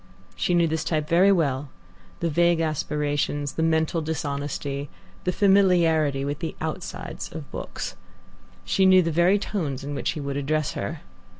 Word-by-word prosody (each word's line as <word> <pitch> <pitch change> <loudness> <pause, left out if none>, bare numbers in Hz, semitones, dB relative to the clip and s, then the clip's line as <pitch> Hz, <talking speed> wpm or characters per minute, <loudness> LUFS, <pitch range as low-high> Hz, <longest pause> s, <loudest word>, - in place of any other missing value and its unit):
She 175 - +1
knew 170 -1 +4
this 160 -1 -1
type 155 -2 -1
very 180 +5 +5
well 145 -6 +1 0.5
the 170 - +1
vague 170 +1 +3
aspirations, 145 -2 -1
the - - -2
mental 160 0 +1
dishonesty, 145 -2 -3 0.4
the 180 - +2
familiarity 170 -8 +3
with 145 +1 -3
the 165 - -4
outsides 160 +3 -5
of 155 -3 -8
books. - - -5 0.7
She 190 -1 +3
knew 185 -1 +7
the 165 - -1
very 175 +5 +4
tones 155 -10 -3
in 145 +1 -4
which 140 - -1
he 160 - -6
would 140 -1 -3
address 150 +1 0
her. 155 -1 -4
160 Hz, 160 wpm, -25 LUFS, 145-170 Hz, 0.7 s, knew